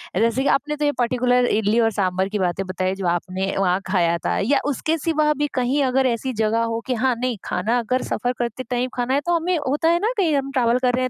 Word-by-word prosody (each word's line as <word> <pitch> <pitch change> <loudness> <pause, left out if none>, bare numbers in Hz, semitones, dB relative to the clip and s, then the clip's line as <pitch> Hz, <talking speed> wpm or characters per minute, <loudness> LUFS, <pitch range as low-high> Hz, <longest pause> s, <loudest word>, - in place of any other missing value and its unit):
अ, - - +1
जैसे 230 +4 +1
कि - - 0
आपने 300 +2 +1
तो 295 - -1
ये 290 - +3
पर्टिकुलर 245 0 +2
इडली 220 0 +1
और 225 -1 +3
साँभर 190 -1 0
की 210 -1 -2
बातें 185 +1 -1
बताई 185 +1 -2
जो 190 -2 -3
आपने 185 +3 -2
वहाँ 185 -1 +2
खाया 170 -3 +2
था - - 0
या 270 +8 +2
उसके 310 +3 -1
सिवा 305 -1 +1
भी 295 0 0
कहीं 260 +3 +1
अगर 260 0 +2
ऐसी 245 +2 -2
जगह 225 +2 +1
हो - - -2
कि 255 - 0
हाँ 250 +1 +1
नहीं 250 -3 -1
खाना 220 +7 0
अगर 255 +3 -1
सफ़र 245 0 -2
करते 240 +1 -3
टाइम 250 +1 -1
खाना 250 +1 -1
है 280 - +3
तो 345 0 +2
हमें 340 +1 0
होता 295 +4 +1
है 340 +1 +3
ना 440 +5 0
कहीं 330 -7 +2
हम 275 0 -1
ट्रैवल 245 -2 +2
कर 250 -1 +1
रहे 255 +1 +1
हैं 255 - -1
245 Hz, 260 wpm, -22 LUFS, 210-275 Hz, -, ये